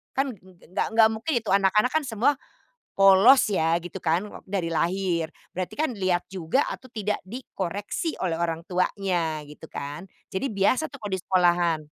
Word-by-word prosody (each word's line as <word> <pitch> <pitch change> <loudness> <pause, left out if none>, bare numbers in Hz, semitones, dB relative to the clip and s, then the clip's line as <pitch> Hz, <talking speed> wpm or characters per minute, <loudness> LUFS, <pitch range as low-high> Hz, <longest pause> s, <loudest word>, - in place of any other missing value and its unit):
kan 270 - +2
ng 205 - -14 0.3
nggak - - 0
nggak 220 -1 +7
mungkin 225 +8 -3
itu 225 - -15
anak-anak 200 +4 +4
kan 315 -1 +1
semua 230 +5 +2 0.6
polos 195 +7 +7
ya 165 -3 +2
gitu 175 +2 -7
kan 170 +4 +1
ok 210 - -10
dari 185 -4 -1
lahir. 175 -1 0 0.3
Berarti 185 0 -4
kan 310 -2 +1
lihat 185 -3 0
juga 185 - +1
atau 255 - -8
tidak 210 -2 -2
dikoreksi 205 - -4
oleh 175 - 0
orang 165 -1 -1
tuanya 180 -4 0
gitu 150 +2 -12
kan. 145 +7 -6 0.3
Jadi 190 +8 -1
biasa 250 +10 +2
tuh 280 - -10
kalo 205 - -5
di 190 - 0
sekolahan. 175 -4 +2
190 Hz, 170 wpm, -25 LUFS, 175-220 Hz, 0.6 s, nggak